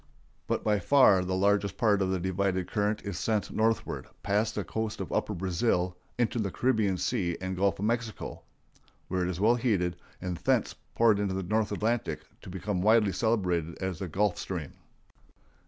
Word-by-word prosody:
But - - -1
by 105 -1 +2
far 100 -4 +5
the 95 0 -1
largest 100 +1 +2
part 105 -5 +3
of 95 - +1
the 95 -1 0
divided 95 0 0
current 105 -1 -1
is 100 -3 -4
sent 105 0 0
northward, 115 +1 0 0.2
past 105 +2 +1
the 105 - -1
coast 110 +3 -3
of - - -5
upper 105 - -1
Brazil 90 0 0 0.2
into 120 0 +1
the 100 -3 0
Caribbean 110 -4 +1
Sea 85 -2 -1
and 95 0 -3
Gulf 100 +1 +1
of 100 - -2
Mexico, 115 -1 -3 0.7
where 95 0 0
it 90 - 0
is 90 -1 -4
well 110 +4 +5
heated, 95 -8 0 0.2
and 90 -1 -4
thence - - +1 0.2
poured 115 -3 +4
into 100 -2 -1
the 95 - -2
North 110 +3 0
Atlantic, 115 +2 -1 0.2
to - - -10
become 95 +1 -2
widely 110 0 +4
celebrated 90 -5 0
as 95 -3 -3
the 95 - -3
Gulf 100 +4 0
Stream. 85 -7 -5
100 Hz, 180 wpm, -29 LUFS, 90-110 Hz, 0.7 s, far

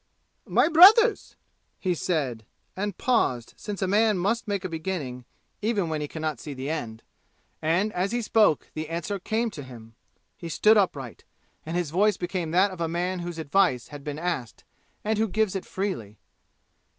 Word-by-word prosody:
"My - - +3
brothers," 400 +9 +6 0.4
he 185 -2 0
said, 140 -10 -2 0.3
and 200 -1 -3
paused, 130 - 0
since 205 -3 -5
a - - +1
man 210 +1 +3
must 210 +6 0
make 200 -2 -2
a - - 0
beginning, 160 -7 -4 0.4
even 205 -5 0
when 155 -1 -2
he 150 - -3
can 155 +2 -7
not 155 -6 -2
see 145 +2 -7
the 135 +3 -4
end. 115 -8 -5 0.6
And 180 +7 +1
as 185 +3 -1
he 240 0 -1
spoke 210 -6 +2
the 155 0 -5
answer 170 +4 -3
came 225 +4 -1
to 155 - -8
him. 115 -4 -12 0.4
He 170 - -8
stood 215 +6 +4
upright, 140 - -1 0.4
and 165 +2 -2
his 175 -5 -2
voice 205 +3 +3
became 175 -2 -3
that 185 +4 +3
of 180 -2 -8
a 165 - +1
man 180 +3 -2
whose 175 -1 -5
advice 160 -5 +1
has 145 -1 -9
been 145 0 -5
asked, 155 - -4 0.4
and 215 0 0
who 220 - +2
gives 215 -1 0
it 190 - -4
freely. 180 - -4
175 Hz, 180 wpm, -26 LUFS, 150-205 Hz, 0.6 s, brothers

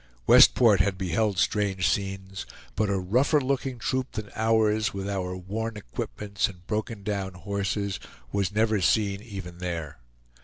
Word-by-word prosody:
Westport 110 - +7
had 95 0 +2
beheld 95 +2 0
strange 100 -1 +1
scenes, 95 -1 -3 0.3
but 105 -2 +1
a 100 - +1
rougher 125 - +2
looking 135 -1 -1
troop 130 +2 -2
than 105 -1 -5
ours, 110 -1 +2
with 95 0 -4
our 95 -2 -2
worn 110 +4 -4
equipments 100 +5 -3
and 90 -3 -13
broken 110 0 -3
down 95 -3 -3
horses, 100 -1 -2 0.3
was 100 -1 0
never 110 -1 +2
seen 100 +1 +2
even 95 -6 -8
there. 85 -6 -4
100 Hz, 145 wpm, -27 LUFS, 95-110 Hz, 0.3 s, Westport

